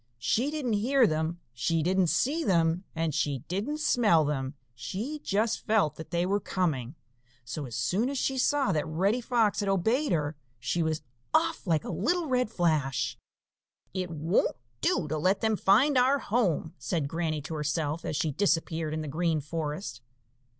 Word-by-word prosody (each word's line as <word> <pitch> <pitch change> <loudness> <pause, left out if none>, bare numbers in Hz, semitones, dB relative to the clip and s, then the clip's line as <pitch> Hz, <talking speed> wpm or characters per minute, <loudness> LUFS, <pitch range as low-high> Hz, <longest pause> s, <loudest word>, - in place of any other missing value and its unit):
She 225 - +1
didn't 295 -7 -2
hear 245 +5 +4
them, 160 +1 -1
she 155 +7 0
didn't 185 +1 +2
see 295 - +1
them, 170 - +2
and 160 -1 -1
she 140 -4 -1
didn't 225 - -2
smell 210 - +4
them; 135 -1 -2 0.2
she 200 - -5
just 215 +3 +1
felt 210 -8 +3
that 160 - -8
they 175 0 0
were 200 +2 +1
coming. 150 - -2 0.5
So 145 +3 -5
as 115 - -7
soon 185 - +1
as 280 - -3
she 265 0 0
saw 285 +1 +2
that 150 -2 0
Reddy 195 +10 +1
Fox 230 -3 +2
had 200 -2 0
obeyed 220 - +1
her, 155 -2 0 0.2
she 125 +9 -1
was 155 -1 -1 0.3
off 325 -7 +1
like 160 -3 +2
a - - -5
little 345 - 0
red 250 -5 +1
flash. 135 - 0 0.8
"It 185 -1 -2
won't 165 +3 0 0.2
do 175 -4 +1
to 155 +1 -2
let 185 +5 +2
them 220 -1 +2
find 250 +9 +4
our 260 +3 +4
home," 200 - 0
said 160 -6 -1
Granny 160 0 -1
to 160 - -6
herself, 150 +1 -1
as - - -3
she 155 +1 0
disappeared 165 -2 0
in 155 - -2
the - - -5
Green 160 +2 0
Forest. 150 - -4
170 Hz, 175 wpm, -28 LUFS, 155-220 Hz, 0.8 s, hear